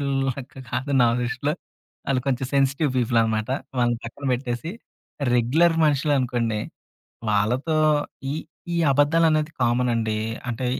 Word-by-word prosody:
మనుషులు 140 Hz, -1 st, -1 dB, 0.2 s
లెక్క 135 Hz, 0 st, -9 dB
కాదు 130 Hz, +4 st, -3 dB
నా 120 Hz, -, +6 dB
దృష్టిలో. 125 Hz, +4 st, -1 dB, 0.6 s
ఆళ్ళు 135 Hz, -2 st, +2 dB
కొంచెం 130 Hz, -1 st, 0 dB
సెన్సిటివ్ 140 Hz, +2 st, +2 dB
పీపుల్ 120 Hz, -1 st, +2 dB
అనమాట. 110 Hz, -1 st, -1 dB, 0.3 s
వాళ్ళని 120 Hz, -1 st, +2 dB
పక్కన 120 Hz, +5 st, -8 dB
పెట్టేసి, 125 Hz, +4 st, -3 dB, 0.6 s
రెగ్యులర్ 150 Hz, +9 st, +3 dB
మనుషులు 145 Hz, 0 st, +2 dB
అనుకోండి 120 Hz, -4 st, -1 dB, 0.7 s
వాళ్ళతో 125 Hz, +10 st, +1 dB, 0.6 s
ఈ, -, -, -2 dB, 0.4 s
ఈ -, -, 0 dB, 0.2 s
అబద్ధాలు 145 Hz, +4 st, +4 dB
అనేది 155 Hz, 0 st, +1 dB
కామన్ 120 Hz, +1 st, +2 dB
అండి. 110 Hz, -2 st, 0 dB, 0.3 s
అంటే 120 Hz, +2 st, -3 dB
125 Hz, 135 wpm, -24 LUFS, 120-145 Hz, 0.7 s, నా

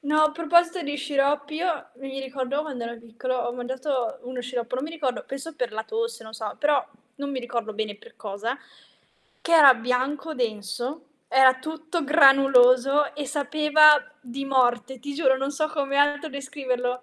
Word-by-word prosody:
No, 300 Hz, +1 st, +2 dB
a 305 Hz, -, +4 dB
proposito 345 Hz, +2 st, +2 dB
di 290 Hz, 0 st, -4 dB
sciroppi 285 Hz, +1 st, -1 dB
io 340 Hz, -3 st, -2 dB
mi 270 Hz, +1 st, -7 dB
ricordo 270 Hz, +2 st, -3 dB
quando 260 Hz, -6 st, -6 dB
ero 235 Hz, 0 st, -7 dB
piccolo 235 Hz, +3 st, -5 dB
ho 240 Hz, -1 st, -2 dB
mangiato 255 Hz, +1 st, -3 dB
uno 250 Hz, 0 st, -6 dB
sciroppo, 245 Hz, 0 st, -4 dB
non 260 Hz, -, -3 dB
mi 315 Hz, -, -6 dB
ricordo 285 Hz, -6 st, -3 dB
penso 280 Hz, +4 st, -7 dB
per 250 Hz, -6 st, -3 dB
la 220 Hz, +1 st, -3 dB
tosse, 460 Hz, -, -4 dB
non 220 Hz, 0 st, -12 dB
so, 220 Hz, -2 st, -6 dB
però, 290 Hz, -2 st, +2 dB, 0.3 s
non 280 Hz, 0 st, -5 dB
mi 260 Hz, -2 st, -3 dB
ricordo 235 Hz, -2 st, -4 dB
bene 215 Hz, -1 st, -4 dB
per -, -, -18 dB
cosa, 215 Hz, +5 st, -4 dB, 0.9 s
che 335 Hz, -, -3 dB
era 285 Hz, -5 st, +9 dB
bianco, 260 Hz, +6 st, -2 dB
denso, 240 Hz, +5 st, -4 dB, 0.3 s
era 260 Hz, 0 st, +6 dB
tutto 315 Hz, +3 st, -4 dB
granuloso 275 Hz, -1 st, +5 dB
e 285 Hz, -1 st, -5 dB
sapeva 300 Hz, +1 st, +5 dB, 0.3 s
di 260 Hz, +1 st, -7 dB
morte. 255 Hz, -1 st, +1 dB
Ti 285 Hz, +3 st, -6 dB
giuro, 265 Hz, -3 st, +3 dB
non 270 Hz, +1 st, -2 dB
so 310 Hz, +2 st, -1 dB
come 280 Hz, -3 st, -2 dB
altro 290 Hz, +2 st, +2 dB
descriverlo. 255 Hz, -2 st, -3 dB
270 Hz, 175 wpm, -24 LUFS, 250-295 Hz, 0.9 s, era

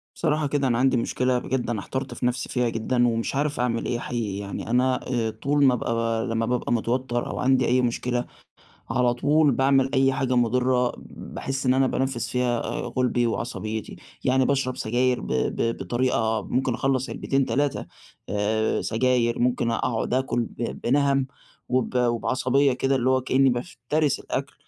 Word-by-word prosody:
بصراحة 150 Hz, -1 st, 0 dB
كده 140 Hz, -1 st, 0 dB
أنا 120 Hz, -2 st, +1 dB
عندي 130 Hz, 0 st, +3 dB
مشكلة 125 Hz, +2 st, 0 dB
بجد 125 Hz, 0 st, -2 dB
أنا 115 Hz, -3 st, -1 dB
احترت 130 Hz, +6 st, -4 dB
في -, -, -4 dB
نَفْسي 125 Hz, +1 st, -1 dB
فيها 125 Hz, -1 st, 0 dB
جدًا 120 Hz, +2 st, +1 dB
ومش 115 Hz, +3 st, -1 dB
عارف 145 Hz, 0 st, -1 dB
أعمل 120 Hz, -2 st, 0 dB
إيه 120 Hz, -, -1 dB
حقيقي، 115 Hz, -6 st, -3 dB
يعني 100 Hz, +2 st, -6 dB
أنا 125 Hz, +2 st, +2 dB
آآ 120 Hz, -3 st, 0 dB
طول 140 Hz, +7 st, 0 dB
ما 130 Hz, -, +5 dB
أبقى 115 Hz, -1 st, -1 dB
لمّا 115 Hz, -1 st, 0 dB
بابقى 125 Hz, 0 st, -1 dB
متوتَّر 120 Hz, +1 st, -1 dB
أو -, -, -5 dB
عندي 130 Hz, 0 st, +3 dB
أي 125 Hz, +1 st, +3 dB
مشكلة، 120 Hz, 0 st, -1 dB, 0.7 s
على 125 Hz, -1 st, +2 dB
طول 150 Hz, +4 st, +3 dB
باعمل 135 Hz, +1 st, +3 dB
أي 135 Hz, 0 st, +3 dB
حاجة 130 Hz, -1 st, 0 dB
مُضرة 125 Hz, +1 st, +2 dB
باحس 135 Hz, 0 st, -5 dB
إن 130 Hz, -, +4 dB
أنا 135 Hz, 0 st, +3 dB
بانفِّس 125 Hz, -3 st, -1 dB
فيها 125 Hz, -1 st, 0 dB, 0.4 s
غُلبي 125 Hz, -1 st, +2 dB
وعصبيتي. 110 Hz, -2 st, -4 dB, 0.3 s
يعني 130 Hz, 0 st, +3 dB
باشرب 130 Hz, -2 st, 0 dB
سجاير 125 Hz, +2 st, +1 dB
ب -, -, -7 dB
ب 115 Hz, -, 0 dB
بطريقة 115 Hz, -3 st, 0 dB
ممكن 130 Hz, -1 st, 0 dB
أخلَّص 130 Hz, +1 st, 0 dB, 0.4 s
علبتين، 145 Hz, 0 st, 0 dB, 0.4 s
آآ 105 Hz, +2 st, 0 dB
سجاير، 120 Hz, 0 st, +1 dB
ممكن 120 Hz, -1 st, +1 dB
أقعُد 115 Hz, 0 st, -1 dB
آكُل 130 Hz, -1 st, 0 dB
ب 115 Hz, 0 st, -5 dB
بنَهَم 140 Hz, 0 st, +2 dB, 0.4 s
وب 130 Hz, 0 st, 0 dB
وبعصبية 130 Hz, +3 st, +2 dB
كده 135 Hz, +2 st, 0 dB
اللي 130 Hz, 0 st, +1 dB
هو 130 Hz, 0 st, +3 dB
كإنّي 135 Hz, +1 st, +3 dB
بافترس 135 Hz, +2 st, -1 dB
الأكل. -, -, -4 dB
125 Hz, 165 wpm, -25 LUFS, 120-130 Hz, 0.7 s, ما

